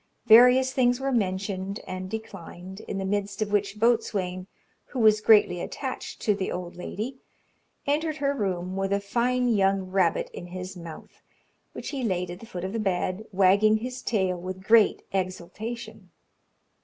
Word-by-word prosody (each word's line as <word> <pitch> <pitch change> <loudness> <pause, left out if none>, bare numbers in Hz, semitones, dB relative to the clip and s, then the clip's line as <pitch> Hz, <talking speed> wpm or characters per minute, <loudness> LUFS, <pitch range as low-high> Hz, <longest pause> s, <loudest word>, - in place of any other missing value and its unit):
Various 250 +3 +7
things 245 -2 +2
were 270 0 -1
mentioned 195 -2 -1
and 185 0 -5
declined, 190 -3 -8
in 195 - -6
the 195 - -2
midst 200 0 -2
of 215 -1 -1
which 205 0 0
Boatswain, 200 -6 0 0.4
who - - -9
was 215 -2 +5
greatly 210 -5 +5
attached 260 -2 -5
to 210 - +3
the 195 -1 -3
old 180 -1 -5
lady, 220 +8 -5 0.7
entered 310 +2 0
her 280 -1 0
room 185 -6 -2
with 195 0 -1
a 200 - +2
fine 245 +5 0
young 195 -3 +3
rabbit 185 -3 +1
in 175 - -8
his 185 +1 -7
mouth, 170 -3 -11 0.5
which - - -6
he 280 -3 -4
laid 180 -5 -1
at 175 - -8
the 230 - -12
foot 180 -3 -6
of 190 +2 -4
the 230 - -1
bed, 190 0 -1
wagging 200 +3 +4
his 250 +3 -6
tail 190 -5 0
with 185 +1 -6
great 220 0 +4
exultation. 205 +3 -5
200 Hz, 165 wpm, -26 LUFS, 185-230 Hz, 0.7 s, Various